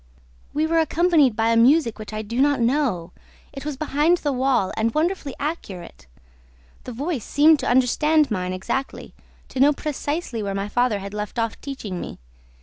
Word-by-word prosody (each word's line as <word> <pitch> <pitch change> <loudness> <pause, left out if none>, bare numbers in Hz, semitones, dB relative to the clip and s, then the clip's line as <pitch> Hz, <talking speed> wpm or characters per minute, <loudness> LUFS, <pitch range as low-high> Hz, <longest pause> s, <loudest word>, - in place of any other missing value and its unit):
"We 305 +2 0
were 330 +1 +2
accompanied 320 -6 +3
by 225 +1 +1
a 230 - +3
music 235 -1 +4
which 215 - -8
I 215 0 -4
do 230 +4 -2
not 285 -1 +3
know: 235 - 0 0.4
it 275 - -7
was 300 -3 -4
behind 310 +4 +2
the 295 -4 -2
wall 255 -6 +1
and 225 +1 0
wonderfully 315 -3 -1
accurate. 195 - -6 0.8
The - - -6
voice 275 - -3
seemed 300 +5 +4
to 255 - -2
understand 285 +4 +3
mine 185 -3 -2
exactly, 190 +9 -4 0.4
to 260 - -6
know 285 +3 +5
precisely 290 -3 -3
where 200 -1 -3
my 195 +1 -3
father 245 -1 +1
had 200 0 -7
left 210 +2 -5
off 230 -1 -2
teaching 220 -10 -6
me. - - -7
260 Hz, 175 wpm, -23 LUFS, 215-300 Hz, 0.8 s, know